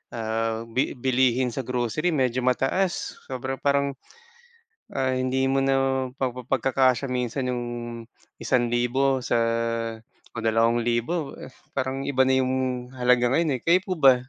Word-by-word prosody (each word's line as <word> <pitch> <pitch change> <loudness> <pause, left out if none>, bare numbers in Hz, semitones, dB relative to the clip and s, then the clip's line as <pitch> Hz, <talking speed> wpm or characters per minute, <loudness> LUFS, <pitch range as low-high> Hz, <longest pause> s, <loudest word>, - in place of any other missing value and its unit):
ah, 115 0 -2
bi 130 +4 0
bilihin 125 0 +2
sa 130 - -4
grocery 125 +7 0
medyo 130 -3 +1
mataas 135 +9 0
sobra 130 +1 -4
parang, 140 -1 +1 1.0
ah, 130 -1 +1
hindi 130 +1 0
mo 135 - +2
na 135 0 +2 0.4
pagpapagkakasya 130 0 +1
minsan 125 +1 -1
yung 120 -1 -2 0.7
1,000 125 +2 +1
sa - - +2 1.0
o - - -6
2,000, 120 +7 +1
eh, - - -9 0.2
parang 135 0 -2
iba 130 -2 +3
na 130 0 +3
yung 130 0 0 0.4
halaga 125 -1 +3
ngayon, 160 -3 +2
eh, - - -22
kayo 175 +2 +4
po 185 - -1
ba? 135 -3 +7
130 Hz, 130 wpm, -25 LUFS, 120-135 Hz, 1.0 s, ba